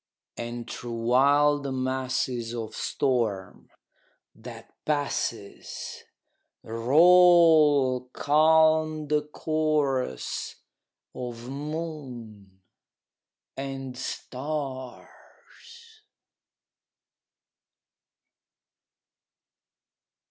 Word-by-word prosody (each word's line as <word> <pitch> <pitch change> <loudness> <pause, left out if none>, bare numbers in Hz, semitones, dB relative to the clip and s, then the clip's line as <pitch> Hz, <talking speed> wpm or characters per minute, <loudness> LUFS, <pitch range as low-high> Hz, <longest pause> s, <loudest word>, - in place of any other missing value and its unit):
And 120 0 -6
through 120 -1 -6
wild 140 +4 +3
masses 130 -2 -2
of 110 -2 -5
storm, 115 -8 -2 0.6
that - - -12
passes, 140 -8 -4 0.6
Roll 150 0 +5
calm 155 0 +3
the 150 0 +2
chorus 150 - -2 0.6
of 120 -1 -7
moon 135 - -7 0.9
and 135 -1 -6
stars. 130 -1 -6
135 Hz, 45 wpm, -26 LUFS, 120-150 Hz, 0.9 s, Roll